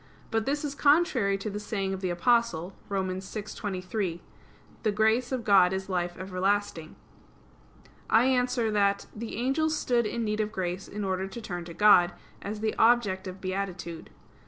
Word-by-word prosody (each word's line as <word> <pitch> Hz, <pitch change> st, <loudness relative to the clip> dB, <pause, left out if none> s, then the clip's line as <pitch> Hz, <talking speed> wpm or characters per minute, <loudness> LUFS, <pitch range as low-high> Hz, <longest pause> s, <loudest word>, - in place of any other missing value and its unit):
But 225 Hz, 0 st, 0 dB
this 290 Hz, +2 st, 0 dB
is 285 Hz, -, -3 dB
contrary 285 Hz, -10 st, +3 dB
to 195 Hz, +2 st, -4 dB
the 205 Hz, -, -4 dB
saying 195 Hz, -2 st, -2 dB
of 190 Hz, -, -5 dB
the 185 Hz, -, -1 dB
Apostle 190 Hz, -2 st, +1 dB, 0.2 s
(Rom. 195 Hz, -1 st, -1 dB
6:23): 190 Hz, -1 st, -4 dB, 0.6 s
"The 215 Hz, -, +1 dB
grace 220 Hz, +4 st, +2 dB
of 255 Hz, -3 st, -2 dB
God 190 Hz, -3 st, +5 dB
is 190 Hz, 0 st, -4 dB
life 175 Hz, -1 st, -2 dB
everlasting." 185 Hz, -3 st, -1 dB, 1.1 s
I 230 Hz, -, +5 dB
answer 250 Hz, -3 st, +1 dB
that, 200 Hz, -1 st, +2 dB
The 225 Hz, +1 st, -6 dB
angels 305 Hz, +6 st, +1 dB
stood 240 Hz, -5 st, +1 dB
in 235 Hz, +2 st, -2 dB
need 215 Hz, 0 st, -1 dB
of 215 Hz, 0 st, -1 dB
grace 185 Hz, -1 st, -3 dB
in 210 Hz, +1 st, -5 dB
order 190 Hz, 0 st, -1 dB
to 195 Hz, -, -8 dB
turn 175 Hz, -6 st, -5 dB
to 170 Hz, -1 st, -9 dB
God, 180 Hz, -4 st, +6 dB, 0.3 s
as 210 Hz, +1 st, -5 dB
the 220 Hz, 0 st, 0 dB
object 215 Hz, -5 st, +3 dB
of 185 Hz, +1 st, -7 dB
beatitude. 185 Hz, -3 st, -4 dB
205 Hz, 165 wpm, -28 LUFS, 185-230 Hz, 1.1 s, God